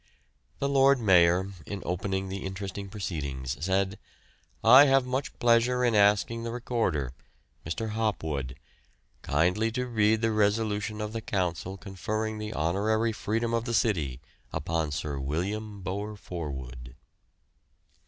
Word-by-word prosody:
"The 140 - -1
Lord 140 -1 +4
Mayor, 95 -2 +4 0.2
in 100 -2 -5
opening 95 +2 -2
the 95 0 -5
interesting 95 +1 -5
proceedings 70 - -4
said: 95 +2 0 0.6
I 130 +5 +9
have 135 -2 +4
much 130 +2 -3
pleasure 120 +1 +3
in 120 - +2
asking 105 +2 +3
the 115 - -4
Recorder, 115 - -1 0.5
Mr. 110 +8 -3
Hopwood, 80 - -2 0.7
kindly 90 +10 +1
to 125 +1 -1
read 110 -2 +2
the 115 - +3
resolution 105 0 0
of 105 0 -4
the 115 - -3
Council 95 -2 -2
conferring 110 +3 -3
the 105 0 -4
honorary 110 +7 +1
freedom 115 +2 -2
of 115 0 0
the 120 -1 -1
city 80 - +1 0.3
upon 80 0 -1
Sir 70 -1 -3
William 100 +9 -3
Bower 100 +3 -4
Forwood. 65 -10 -7
100 Hz, 130 wpm, -28 LUFS, 85-115 Hz, 0.7 s, I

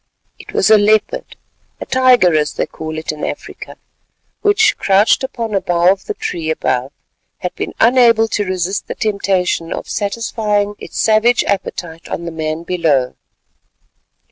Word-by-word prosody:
It - - -11
was - - +2
a 215 - +7
leopard—a 215 +1 -2
tiger 255 -9 +4
as 150 -1 +1
they - - -1
call 155 0 -7
it 155 - -3
in 150 -1 -8
Africa—which, 415 0 -3
crouched 200 +6 +3
upon 235 -4 -4
a 195 - +1
bough 175 +1 +3
of 195 0 -3
the - - -4
tree 160 -2 -4
above, 130 -4 -1 0.5
had 180 - -4
been - - -5
unable 230 -2 +5
to 205 - -1
resist 185 0 -2
the - - -5
temptation 190 -5 -1
of - - -5
satisfying 205 -1 -1
its - - -7
savage 220 +2 +3
appetite 175 -4 -4
on 170 - -4
the 170 - -4
man 160 0 -4
below. 160 -8 0
195 Hz, 145 wpm, -17 LUFS, 165-220 Hz, 0.5 s, a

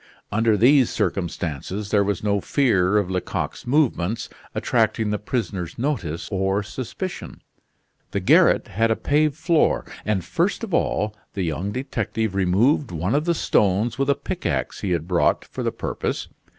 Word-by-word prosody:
Under 110 0 +3
these 130 +3 +5
circumstances 90 +2 -3
there 105 -1 +4
was 100 -1 -2
no 100 -1 +1
fear 105 -8 +2
of 100 -3 0
Lecoq's 90 +5 -3
movements 115 - +1 0.3
attracting 110 -2 +1
the 105 - -1
prisoner's 105 -7 -3
notice 105 - -2
or 95 +1 0
suspicion. 130 - -6 0.7
The - - -1
garret - - +4
had 115 +4 +1
a 110 - +3
paved 150 +3 +1
floor, 160 0 +2 0.2
and 100 -5 -1
first 180 - 0
of 210 -6 -5
all 105 -9 0 0.2
the 95 - -1
young 85 +4 -2
detective 115 -4 -2
removed 100 - +2
one 90 +4 -2
of 150 +2 +1
the 170 -1 +2
stones 105 0 +1
with 135 +1 +1
a 140 - +4
pickax - - -3
he 100 - -2
had 85 -2 -1
brought 90 -2 +2
for - - -7
the - - 0
purpose. - - -3
105 Hz, 155 wpm, -23 LUFS, 95-130 Hz, 0.7 s, these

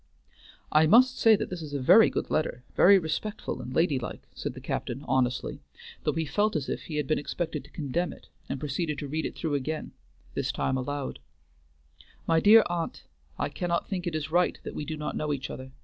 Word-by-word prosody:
"I 155 +1 +5
must 255 +8 +5
say 225 -1 +7
that 195 - -4
this 180 -2 -4
is 145 -2 -6
a - - 0
very 175 - +7
good - - -3
letter, 125 -5 -1
very 200 +2 +7
respectful 190 - -3
and 125 0 -7
lady 150 -1 +2
like," 125 - -7
said - - -5
the - - -7
captain 130 +4 -4
honestly, 130 -1 0 0.4
though - - +2
he 160 0 -1
felt 205 +8 +1
as 145 -3 -2
if - - -4
he 155 - -6
had 150 -1 0
been 155 - +1
expected 165 +3 -3
to - - -16
condemn 160 +3 -2
it, - - -14 0.2
and 135 - -3
proceeded 150 +2 -2
to 145 - -5
read 155 +3 -2
it - - -9
through 160 -3 -2
again, 150 +3 -2 0.4
this - - -1
time 130 - -1
aloud: 135 - -3 1.1
MY 165 0 +3
DEAR 215 +5 +8
AUNT, 175 -1 -3 0.3
I - - -1
cannot 170 -1 -2
think 185 -3 -3
it 165 - -2
is 155 -1 -3
right 175 +2 +2
that - - -6
we 150 - -4
do 155 0 -4
not 150 - -4
know 150 -1 -1
each 135 -2 -4
other. 130 0 -8
155 Hz, 215 wpm, -28 LUFS, 140-175 Hz, 1.1 s, DEAR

